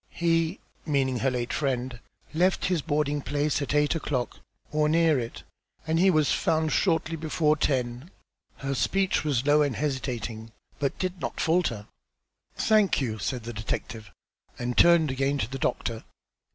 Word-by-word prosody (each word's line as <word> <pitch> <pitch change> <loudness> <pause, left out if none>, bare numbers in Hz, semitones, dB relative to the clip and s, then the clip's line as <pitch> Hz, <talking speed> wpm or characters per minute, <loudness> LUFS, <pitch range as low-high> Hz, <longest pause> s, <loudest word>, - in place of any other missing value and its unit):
"He," 165 +1 0 0.2
meaning 135 -5 0
her 135 - +2
late 125 -1 -3
friend, 130 -4 -2 0.3
"left 180 +4 +2
his 180 -4 +1
boarding 145 -1 0
place 145 +2 0
at 140 0 -2
eight 150 0 +3
o'clock, 140 -6 -3 0.3
or 150 0 +2
near 160 -3 +3
it, 115 -1 -6 0.4
and 160 +1 +1
he 190 +2 +5
was 155 -5 +3
found 160 -1 +1
shortly 165 -3 +1
before 155 -1 +1
ten." 130 0 -1 0.5
Her 135 0 -3
speech 190 +8 +1
was 140 -4 0
low 145 +1 +5
and 145 -5 +1
hesitating, 120 -6 -3 0.3
but 140 -2 0
it - - -28
did 185 -2 -3
not - - -4
falter. 160 - +1 0.7
"Thank 215 -3 +3
you," 110 -5 -2
said 120 +4 -3
the 120 +1 -6
detective, 110 -1 -5 0.5
and 120 0 -3
turned 170 -4 +5
again 135 +2 0
to 110 - -1
the 135 +2 -6
doctor. 115 -3 -2
145 Hz, 160 wpm, -27 LUFS, 125-160 Hz, 0.7 s, he